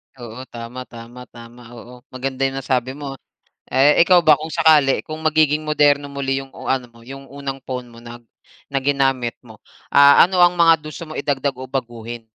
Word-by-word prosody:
Oo, 125 +1 -10
tama, 120 +2 -9
tama, 120 +2 -12
tama. 120 +1 -14
Oo. 125 +1 -13
Maganda 135 +1 -2
yung 135 - -6
nasabi 130 0 -2
mo. 140 -2 -7 0.5
Eh, 140 +5 +4
ikaw 180 +1 +5
ba, 155 -2 +5
kung 155 +1 -8
sakali, 155 -4 +3
kung 155 0 -7
magiging 155 -1 +2
moderno 145 -2 +2
muli 135 -1 -3
yung 135 - -15 0.2
ano 130 -2 -2
mo, 115 0 -20
yung 135 +1 -10
unang 135 -1 -7
phone 125 -1 -6
mo 115 0 -15
na 120 0 -10 0.6
ginamit 135 -3 0
mo, 110 -2 -16 0.3
ah, 140 +3 +7
ano 180 -1 +1
ang 175 0 +4
mga 165 -1 +6 0.2
gusto 165 +3 -9
mo 155 - -10
idagdag 140 -1 -2
o 130 +1 -10
baguhin? 120 -3 -6
135 Hz, 180 wpm, -20 LUFS, 125-145 Hz, 0.6 s, ah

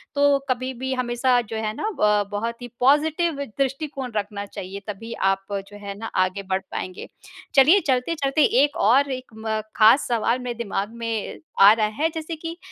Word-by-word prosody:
तो 285 0 +4
कभी 255 +1 -1
भी 260 +2 -3
हमेशा 250 0 +1
जो 225 -1 -6
है 215 -1 -2
ना - - -3
अ, 210 - +2
बहुत 230 +4 -3
ही 245 - -6
पॉज़िटिव 300 +3 +2
दृष्टिकोण 275 -1 -2
रखना 205 -1 -3
चाहिए 195 0 -7
तभी 225 +3 -6
आप 195 -1 0 0.2
जो 205 - -12
है 200 -1 -6
ना, 225 - -7
आगे 185 +1 0
बढ़ 190 0 +1
पाएँगे। 185 0 -5 0.5
चलिए, 295 +9 +7
चलते-चलते 275 +2 +1 0.2
एक 290 0 0
और 275 +4 +4
एक 255 -1 -6
म 220 0 -2 0.2
ख़ास 225 +5 +6
सवाल 235 +1 +1
मेरे 250 -1 -4
दिमाग 205 -3 -2
में 230 -2 -4 0.2
आ 200 +1 +10
रहा 215 -1 +1
है 320 +2 +2
जैसे 320 +1 -4
कि 330 +2 -7
240 Hz, 180 wpm, -23 LUFS, 210-280 Hz, 0.5 s, आ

